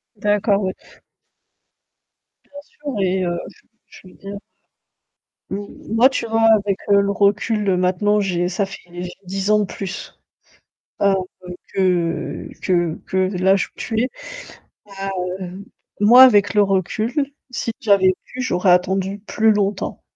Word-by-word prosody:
D'accord, 205 0 +1
ouais. 185 - -1 1.7
Bien 285 0 -12
sûr 290 -2 -7
et 185 0 +1
heu, 175 0 -2
j - - -21 0.3
je 185 - -15
veux - - -16
dire 200 +1 -8 1.1
M 200 +1 -4 0.3
moi, 250 +4 +6
tu 245 -3 -3
vois, 225 0 0 0.2
avec, 200 -1 0
heu, 200 0 +6
le 200 0 0
recul, 205 +1 +1
heu, 180 - +2
maintenant 195 +3 +2
j'ai 180 -3 0
ça 195 +2 -1
fait 195 - -10
j'ai 175 0 -6
10 195 +2 -3
ans 210 0 +5
de 205 - +1
plus, 195 0 -7 0.8
heu, 200 -1 +4 0.6
que 180 -3 -1
que 175 -3 +1
que 190 - -3 0.2
l'âge 190 +1 +2
où - - -21
tu 225 0 -1
es, 255 - 0 1.3
hem, 185 +2 -7 0.4
moi, 240 +5 +8
avec 205 -5 +4
le 205 - +5
recul, 195 +4 0 0.4
si 230 -2 -3
j'avais 195 -5 +4
pu, 255 0 -7
j'aurais 180 -5 +2
attendu 190 +2 +1
plus 220 0 +3
longtemps. 200 -1 -2
200 Hz, 145 wpm, -20 LUFS, 185-210 Hz, 1.7 s, moi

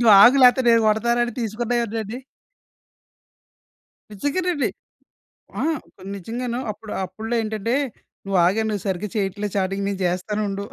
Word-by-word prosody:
Dog 230 +3 +8
లేతే 250 +1 +7
నేను 230 -1 +5
కొడతాను 235 +3 +2
అని 240 - -5
తీసుకున్నాయి 235 +2 -1
ఉన్నాయండి. 220 +1 -4 1.9
నిజంగానండి. 290 - 0 0.9
ఆ! - - 0 0.5
నిజంగాను. 235 +5 -4
అప్పుడు 210 +1 -11
అప్పుడులో 220 +5 -4
ఏంటంటే 220 +2 -1 0.5
నువ్వు 195 -1 0
ఆగే, 200 +5 +2
నువ్వు 205 -4 -3
సరిగ్గా 190 +2 -2
చేయట్లేదు. 205 0 -2
చాటింగ్ 195 +1 -1
నేను 195 -1 -4
చేస్తానుండు 200 +3 -2
215 Hz, 120 wpm, -22 LUFS, 200-240 Hz, 1.9 s, Dog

